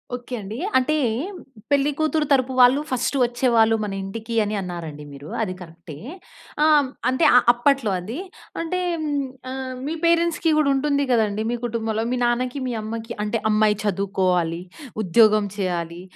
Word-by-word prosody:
Okay 245 0 -6
అండి. 205 +4 -7 0.2
అంటే 260 +4 +1 0.8
పెళ్లి 285 +1 +3
కూతురు 310 0 +1
తరపు 260 -1 +3
వాళ్ళు 250 +3 +6
ఫస్ట్ 255 +2 -1
వచ్చేవాళ్ళు 235 -2 +3
మన 205 -2 -3
ఇంటికి 220 +4 -6
అని 210 +1 -2
అన్నారండి 165 -5 -6
మీరు 140 +2 -10
అది 185 -4 -2
కరె‌క్టే. 165 -3 -11 0.7
ఆహ్, 300 -3 +5 0.2
అంటే 260 +5 0
ఆ - - +10 0.2
అప్పట్లో 240 -3 +1
అది. 220 - -6 0.4
అంటే 350 +2 -2 0.7
ఆహ్, 260 -1 -5
మీ 310 - -2
పేరెంట్స్‌కి 335 -1 +2
కూడా 300 -2 +3
ఉంటుంది 280 +1 +1
కదండీ! 220 -2 +1
మీ - - 0
కుటుంబంలో 225 -1 -2
మీ 255 - 0
నాన్నకి, 250 +3 -1
మీ 245 - -2
అమ్మకి 225 +1 -5
అంటే 215 +2 -1
అమ్మాయి 215 -1 +3
చదువుకోవాలి. 185 -4 0 0.4
ఉద్యోగం 215 +2 +4
చేయాలి. 175 -3 -3
230 Hz, 145 wpm, -22 LUFS, 195-265 Hz, 0.8 s, ఆ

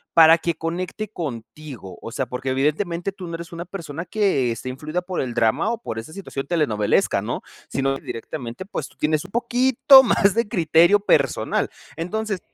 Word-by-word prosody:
para 165 0 +8
que 170 0 -1
conecte 180 +6 -4
contigo?, 130 - -7
o - - -6
sea, 130 +3 -2
porque 125 +2 -6
evidentemente 170 +7 0
tú 190 -2 -9
no 170 - -5
eres 170 0 -8
una 170 0 -6
persona 170 -3 -6
que 185 - +1
esté 115 +2 -4
influida 155 +7 -3
por 180 0 -4
el 125 -3 -2
drama 115 - +2
o 235 - -2
por 115 - -5
esa 115 +8 -9
situación 140 -8 -6
telenovelesca, 115 -12 +1
¿no?, - - -3 0.3
sino 135 0 -1
directamente, 120 +5 -7
pues, 175 -7 -5
tú - - -22
tienes 155 +2 0
un 190 - -13
poquito 255 +3 +6
más 200 -4 +3
de 230 -1 0
criterio 170 +2 +4
personal. 205 - +1 0.3
Entonces, 205 +3 -2
165 Hz, 175 wpm, -22 LUFS, 135-195 Hz, 0.3 s, para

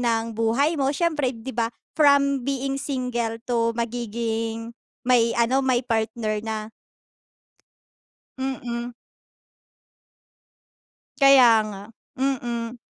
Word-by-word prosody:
ng 230 -1 0
buhay 230 +8 +1
mo 270 - +2
syempre, 300 -5 0
di 230 +3 -7
ba, 230 0 0 0.3
from 280 -2 +4
being 275 0 -1
single 250 -4 -2
to 230 -2 +1
magiging 230 -1 -3 0.3
may 240 -2 +3
ano 235 +3 +2
may 255 -1 +2
partner 220 -2 -1
na. 220 0 -3 1.8
Mm. 245 -2 -4 2.3
Kaya 275 -3 +8 0.2
nga, 200 -2 -8 0.3
mm. 240 -3 -2
240 Hz, 95 wpm, -24 LUFS, 230-265 Hz, 2.3 s, Kaya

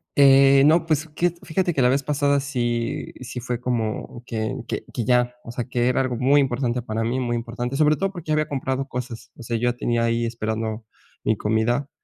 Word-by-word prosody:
Eh, 135 0 +7
no, 160 +3 +4
pues 155 0 +1
que, 175 +4 +1
fíjate 175 +2 0
que 140 - +1
la 125 - +5
vez 135 +2 +2
pasada 145 0 +1
sí 120 -4 -2
sí, 125 0 -6
fue 120 0 -3
como, 120 -1 -3
que 110 -2 -3
que - - -3
que 120 - -3
ya, 125 0 +2
o 115 - -8
sea, 120 0 -4
que 125 -1 0
era 125 - +2
algo 130 -2 -1
muy 140 +4 +4
importante 125 -2 -1
para 115 -1 -3
mí, 120 +3 -1
muy 120 -2 -1
importante, 120 +2 -4
sobre 150 +1 +4
todo 195 0 -1
porque 175 -5 -9
ya - - +3
había 155 -1 +1
comprado 135 -1 -2
cosas. 120 -4 -6
O - - -11
sea, 115 0 -2
yo 120 +1 0
tenía 120 -1 0
ahí 115 0 +1
esperando 110 -1 -3 0.4
mi 110 - +1
comida 110 +7 0
125 Hz, 215 wpm, -23 LUFS, 115-140 Hz, 0.4 s, Eh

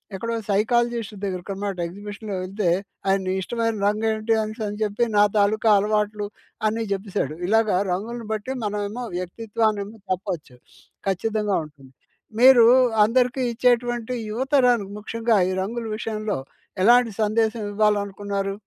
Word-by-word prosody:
ఎక్కడో 230 +4 -3
సైకాలజిస్ట్ 230 +1 +1
దగ్గరకన్నమాట 195 +1 -4
ఎగ్జిబిషన్‌లో 205 +2 -7
యెళ్తే, 190 0 -1 0.4
ఆయన 195 -1 +1
ఇష్టమైన 230 +3 -1
రంగు 215 +2 0
ఏంటి 220 +1 0
అనేసి 220 +1 -5
అని 205 +1 -5
చెప్పి 210 +3 0
నా 205 - +7
తాలూకా 215 +2 +3
అలవాట్లు 210 0 0 0.4
అన్ని 225 +1 -1
జెప్పేసాడు. 195 -7 -2
ఇలాగా 220 -1 +3 0.2
రంగులను 225 +5 -4
బట్టి 215 +5 -3
మనమేమో 210 +3 -3
వ్యక్తిత్వాన్నేమో 210 +2 -2 0.2
చెప్పొచ్చు. 175 -8 -4 0.5
ఖచ్చితంగా 210 +1 0
ఉంటుంది. 140 -3 -17 0.5
మీరు 250 -1 +8 0.4
అందరికీ 250 +3 +2
ఇచ్చేటువంటి 240 0 +1 0.2
యువతరానికి 245 -4 +2
ముఖ్యంగా 230 +1 0
ఈ - - -1
రంగుల 230 +4 -4
విషయంలో 215 -1 -3 0.5
ఎలాంటి 240 +1 +5
సందేశం 220 +1 +1
ఇవ్వాలనుకున్నారు? 200 -1 0
215 Hz, 115 wpm, -23 LUFS, 200-230 Hz, 0.5 s, మీరు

